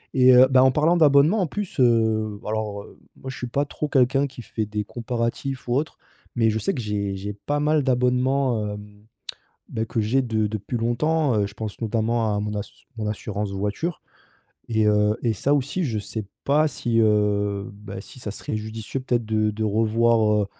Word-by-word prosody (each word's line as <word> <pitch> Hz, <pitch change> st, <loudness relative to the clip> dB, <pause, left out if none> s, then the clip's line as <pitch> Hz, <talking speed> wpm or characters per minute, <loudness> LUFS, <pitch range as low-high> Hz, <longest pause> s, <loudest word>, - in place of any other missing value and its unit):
et 130 Hz, -1 st, +7 dB
heu, 130 Hz, +1 st, +8 dB
bah, 130 Hz, -1 st, +5 dB
en 130 Hz, -, +5 dB
parlant 155 Hz, +6 st, +3 dB
d'abonnement 150 Hz, +6 st, +5 dB
en 180 Hz, -, +1 dB
plus, 205 Hz, -2 st, -5 dB
heu, 110 Hz, -3 st, +2 dB
alors, 105 Hz, -2 st, -3 dB
heu, -, -, -16 dB, 0.2 s
moi 130 Hz, -, -8 dB
je 130 Hz, -, -7 dB
suis 125 Hz, -, -4 dB
pas 140 Hz, +4 st, 0 dB
trop 150 Hz, +1 st, -4 dB
quelqu'un 135 Hz, +1 st, +3 dB
qui 130 Hz, -3 st, -8 dB
fait 110 Hz, -1 st, -3 dB
des 105 Hz, 0 st, -3 dB
comparatifs 120 Hz, +4 st, -3 dB
ou 120 Hz, -, +1 dB
autres, 150 Hz, +4 st, -2 dB, 0.4 s
mais 115 Hz, -2 st, +3 dB
je 110 Hz, -, 0 dB
sais 195 Hz, -, -1 dB
que 130 Hz, -, -4 dB
j'ai 100 Hz, -2 st, -2 dB
j'ai 100 Hz, +2 st, -5 dB
pas 145 Hz, +8 st, -3 dB
mal 150 Hz, 0 st, +2 dB
d'abonnements, 125 Hz, -2 st, +1 dB
hem, 105 Hz, 0 st, -12 dB, 0.7 s
beh, 110 Hz, 0 st, -2 dB
que 115 Hz, -, -1 dB
j'ai 120 Hz, +5 st, +2 dB
de 110 Hz, -3 st, 0 dB
depuis 105 Hz, +3 st, -4 dB
longtemps, 125 Hz, +4 st, +1 dB
heu, 100 Hz, -, +2 dB
je 100 Hz, -, -14 dB
pense 110 Hz, -2 st, -6 dB
notamment 115 Hz, -1 st, 0 dB
à -, -, 0 dB
mon 105 Hz, 0 st, -3 dB
ass 105 Hz, 0 st, -4 dB, 0.3 s
mon 110 Hz, -1 st, -3 dB
assurance 105 Hz, -1 st, -3 dB
voiture, 105 Hz, -, -3 dB, 0.7 s
et 110 Hz, -1 st, +2 dB
heu, 105 Hz, 0 st, +3 dB
et 115 Hz, -, +2 dB
ça 140 Hz, +7 st, +1 dB
aussi 145 Hz, +6 st, -1 dB
je 115 Hz, -6 st, -1 dB
sais 105 Hz, 0 st, -5 dB, 0.2 s
pas 150 Hz, +3 st, +3 dB
si, 120 Hz, -5 st, -1 dB
heu, 105 Hz, -2 st, +1 dB
bah, 100 Hz, -1 st, -9 dB
si 130 Hz, -, -14 dB
ça 105 Hz, -, -5 dB
serait 105 Hz, -, -5 dB
judicieux 110 Hz, +4 st, -5 dB
peut-être 120 Hz, -3 st, 0 dB
de 110 Hz, 0 st, +1 dB
de 110 Hz, +1 st, -3 dB
revoir, 110 Hz, 0 st, +2 dB
heu, -, -, -2 dB
115 Hz, 200 wpm, -24 LUFS, 105-130 Hz, 0.7 s, heu